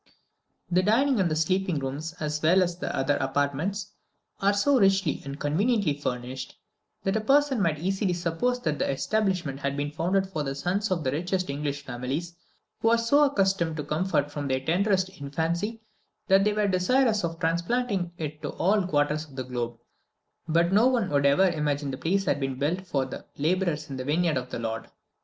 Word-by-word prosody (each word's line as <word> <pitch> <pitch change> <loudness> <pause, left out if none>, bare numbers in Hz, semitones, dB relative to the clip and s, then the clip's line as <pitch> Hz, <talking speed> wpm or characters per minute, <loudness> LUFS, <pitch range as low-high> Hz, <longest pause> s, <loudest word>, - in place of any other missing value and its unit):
The 180 +1 +4
dining 240 +6 +3
and 170 -5 +1
sleeping 185 +1 +1
rooms, 140 +5 -4
as 150 -1 -2
well 180 +4 +5
as 175 -1 -1
all 175 - -19
the - - -3
other 140 +2 +1
apartments, 145 +10 -1 0.5
are 200 +1 +3
so 255 +7 +3
richly 195 -5 +2
and 140 +1 -7
conveniently 195 - +1
furnished, 130 -2 -5 0.5
that 195 +1 0
a 220 - +1
person 275 0 +3
might 165 -5 +1
easily 190 +3 0
suppose 175 +9 -1
that 155 -7 -1
the - - 0
establishment 180 -3 -1
had 140 0 -2
been 145 +1 -2
founded 180 +5 +1
for 160 -5 -3
the 135 -1 -3
sons 190 +8 -1
of 175 -4 0
the 130 - 0
richest 180 +2 -1
English 145 0 -3
families, 140 +9 -4 0.4
who - - 0
were 230 +1 +5
so 285 +6 +4
accustomed 195 - +1
to 150 - -3
comfort 150 -1 0
from 145 -1 -4
their 130 -1 0
tenderest 190 +3 +2
infancy 170 +10 -2 0.4
that 195 0 +5
they 210 - +2
were 210 0 +1
desirous 210 +4 +2
of 165 -1 -2
transplanting 180 +3 0
it 155 -2 -5
to - - -3
all 195 0 +2
quarters 150 -1 +1
of 140 -4 -16
the 130 - -3
globe; 120 -2 -4 0.7
but 170 +3 +2
no 220 +5 +6
one 240 -9 +1
would 140 -1 +3
ever 165 +8 +5
imagine 150 -4 -1
the 130 - -5
place 195 +7 0
had 145 -5 +1
been 135 -2 -2
built 170 +7 -1
for 135 -5 0
"the 130 - -8
labourers 160 -1 0
in 135 - -6
the 130 - -4
vineyard 160 +3 +1
of 125 -1 -3
the - - -4
Lord." 115 -1 -4
170 Hz, 195 wpm, -27 LUFS, 145-195 Hz, 0.7 s, no